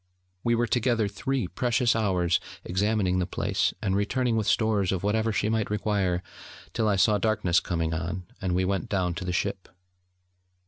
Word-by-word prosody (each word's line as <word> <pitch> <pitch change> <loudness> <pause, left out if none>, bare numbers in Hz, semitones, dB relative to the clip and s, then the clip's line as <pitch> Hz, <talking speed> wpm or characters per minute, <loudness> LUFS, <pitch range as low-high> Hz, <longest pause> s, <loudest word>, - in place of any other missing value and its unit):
We 120 0 +2
were 120 +1 +2
together 120 -2 +1
three 120 +3 -2
precious 120 +2 +1
hours, 90 -6 +2 0.3
examining 95 -1 +1
the 90 - 0
place, - - 0
and 95 -1 +1
returning 115 +4 +1
with 110 -2 0
stores 105 -4 +2
of 95 -1 -2
whatever 110 +2 +1
she 105 0 0
might 110 -1 0
require, 100 -4 0 0.5
till 110 - +1
I 105 - +3
saw 105 +2 +3
darkness 95 -4 +2
coming 80 -2 -2
on, 85 +3 -3 0.2
and 90 -2 0
we 95 +1 +2
went 95 -1 -1
down 90 -3 0
to 90 +2 -5
the 90 - -1
ship. 85 - -2
100 Hz, 175 wpm, -27 LUFS, 90-110 Hz, 0.5 s, I